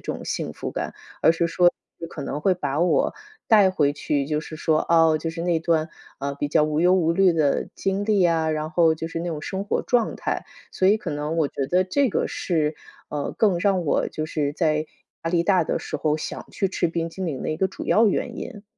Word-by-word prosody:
种 - - -8
幸 - - -3
福 - - -5
感。 - - -4 0.3
而 160 - +5
是 165 +1 0
说 175 +1 +4 0.4
可 150 - -7
能 140 +2 -4
会 185 +3 +3
把 145 -4 -3
我 175 -3 +2 0.3
带 210 -4 +6
回 145 -6 +2
去， 145 -1 -1
就 150 0 -1
是 155 - -9
说， 155 0 +1
哦， 165 -2 +5
就 165 - -3
是 165 +1 -5
那 175 -2 +1
段， 160 -1 +1 0.3
啊， 140 +1 -3
比 145 - -2
较 150 +1 +3
无 150 0 0
忧 180 +2 +5
无 165 -3 +2
虑 190 0 +4
的 150 -4 +1
经 195 +1 -1
历 205 -3 +3
啊， 165 -2 +2
然 155 0 -2
后 165 -2 +4
就 165 +1 -5
是 165 - -4
那 170 +1 -3
种 155 -3 -4
生 195 +3 -4
活 205 - -1
状 240 -3 +1
态。 - - -3 0.3
所 185 - +1
以 205 +3 +5
可 - - -5
能 150 +2 -3
我 155 -4 +2
觉 135 - -3
得 180 +1 +3
这 265 +8 +1
个 - - -1
是， 155 -3 -1 0.3
呃， 145 -1 -3
更 195 -6 +3
让 190 -2 +1
我 145 - +1
就 155 - -4
是 150 -2 -2
在 155 -1 0 0.4
压 165 - -1
力 170 -1 +2
大 180 -1 +3
的 - - -1
时 - - -4
候 150 -1 0
想 155 - -6
去 195 - 0
吃 180 - 0
冰 165 0 -2
激 190 - -7
凌 150 -7 -3
的 - - -3
一 155 - -2
个 190 - +2
主 190 - -8
要 225 +1 +4
原 230 +3 -1
因。 210 -5 -7
165 Hz, 255 characters per minute, -24 LUFS, 155-185 Hz, 0.4 s, 带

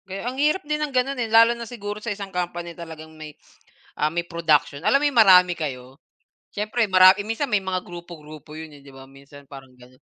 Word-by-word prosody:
Ge 190 - -6
ang 245 - -3
hirap 305 +5 +1
din 300 0 -2
ng 300 - -1
ganun, 260 +2 0
eh. 230 - -3
Lalo 230 +1 +5
na 235 -1 -9
siguro 210 -3 -7
sa 235 - -5
isang 200 -1 -9
company 175 -1 -4
talagang 160 -2 -11
may, 155 -1 -11 0.7
ah, 150 - +2
may 170 +1 -3
production. 155 -4 0
Alam 275 - +3
mo - - +1
'yong 270 -5 +3
marami 180 -3 +6
kayo? 130 -4 -7 0.5
Siyempre 215 +3 -1
mara 185 0 +7
eh, - - -2
minsan 225 +5 -3
may 210 -2 +1
mga 185 -1 -3
grupo-grupo 155 -4 -11
yun, 160 0 -9
eh, - - -20
di 140 - -15
ba? 135 0 -13
Minsan 140 +1 -16
parang 135 -2 -13
ganon. 125 +1 -19
175 Hz, 220 wpm, -22 LUFS, 150-220 Hz, 0.7 s, mara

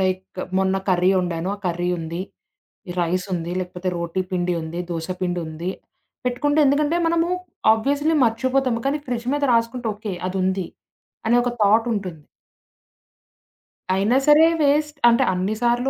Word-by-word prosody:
Like 185 0 -2 0.2
మొన్న 190 0 +1
curry 180 0 +3
వండాను, 175 -1 -2
ఆ - - -21
కర్రీ 175 0 -1
ఉంది. 165 +2 -5 0.7
ఈ - - -2
రైసుంది, 180 0 -2
లేకపోతే 180 0 -4
రోటి 170 +2 -2
పిండి 180 -1 0
ఉంది, 160 +2 -5
దోస 165 +1 -4
పిండుంది. 175 -1 -3 0.6
పెట్టుకుంటే 290 +5 +1
ఎందుకంటే, 295 +4 +2
మనము 335 +1 +1 0.5
ఆబ్వియస్‌లి 285 +7 +1
మర్చిపోతాము, 250 +1 +1
కానీ 290 +2 0
ఫ్రిడ్జ్ 240 -2 -3
మీద 290 - 0
రాసుకుంటే 230 +1 0
ఓకే 210 -1 -6 0.2
అది 185 - -4
ఉంది 190 -1 0 0.6
అనే 235 +2 +4
ఒక 245 - 0
థాటుంటుంది. 205 -7 +1 1.7
అయినా 205 +7 +2
సరే 300 +2 +7
వేస్ట్ 300 +1 +2
అంటే 235 - +4
అన్ని 185 +3 -1
సార్లు 245 +2 +2
200 Hz, 135 wpm, -22 LUFS, 180-255 Hz, 1.7 s, సరే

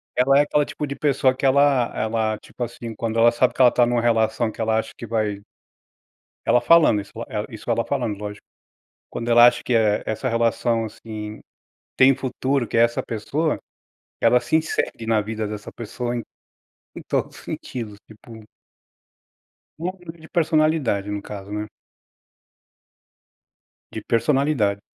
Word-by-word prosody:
ela 135 +2 +4
é 145 - +6
aquele 145 0 +1
tipo 150 - -5
de 140 -1 -5
pessoa 135 -3 +2
que 135 +1 0
ela 135 -3 +3
ela, 110 -1 0
tipo 120 - -8
assim, 115 -1 -6
quando 115 0 -3
ela 115 +1 +6
sabe 120 +1 +1
que - - 0
ela 125 - +8
está 120 0 +3
numa 120 -1 +1
relação, 110 -1 +1
que - - -8
ela 110 0 +1
acha 110 0 -2
que 115 - -8
vai 105 -3 -1 1.1
Ela 125 - +4
falando, 150 -7 +5
isso, 100 - -14 0.2
eh, 105 -1 -3
isso 110 +1 -9
ela 115 0 +1
falando, 115 -4 -2
lógico, 105 0 -7 0.6
quando 120 0 -5
ela 120 +1 +8
acha, 120 - +1
que 125 - -1
é, 110 -2 +2
essa 110 +4 -2
relação, 115 -1 +1
assim, 110 -1 -8 0.6
tem 130 +1 +6
futuro, 130 -1 -1
que - - -5
é 115 - +5
essa 120 0 +1
pessoa, 145 +8 -2 0.6
ela 125 - +4
se 140 +6 +1
insere 155 -7 -2
na 110 -1 +2
vida 110 +1 -4
dessa 105 0 -7
pessoa 120 +1 -4
em 120 - -3 0.7
em - - -7
todos - - -2
os - - -13
sentidos, 110 -5 -6
tipo 110 +1 -13 1.4
No 170 +3 -2
nivel 170 -2 -11
de 160 - -14
personalidade 155 - +1
no 105 0 -3
caso, 100 -1 -9
né. 105 0 -3 2.3
De - - -6
personalidade. 120 -5 +1
115 Hz, 165 wpm, -22 LUFS, 110-130 Hz, 2.3 s, ela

